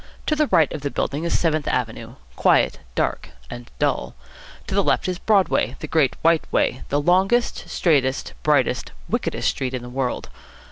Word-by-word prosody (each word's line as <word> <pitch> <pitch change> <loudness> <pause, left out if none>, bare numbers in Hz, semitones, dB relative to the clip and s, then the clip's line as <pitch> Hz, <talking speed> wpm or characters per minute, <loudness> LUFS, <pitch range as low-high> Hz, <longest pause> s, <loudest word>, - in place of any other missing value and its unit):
To 305 - +1
the 305 -1 +2
right 160 - +3
of 150 - -5
the 140 - -2
building 145 +3 -2
is 170 - +1
Seventh 155 -3 0
Avenue, 115 -1 -3 0.2
quiet, - - +3 0.2
dark, - - -1 0.2
and 120 0 -8
dull. 60 - -1 0.5
To - - -5
the - - +3
left - - +1
is 180 0 -2
Broadway, 200 -4 +2
the - - -6
Great 150 -4 +2
White 165 0 +2
Way, 130 - +1
the 145 - +1
longest, 190 +9 +1
straightest, 140 -5 +1
brightest, 145 -5 +1 0.2
wickedest - - -1
street 130 -1 -3
in 125 - -5
the 120 - -8
world. 125 0 -3
145 Hz, 175 wpm, -22 LUFS, 130-175 Hz, 0.5 s, right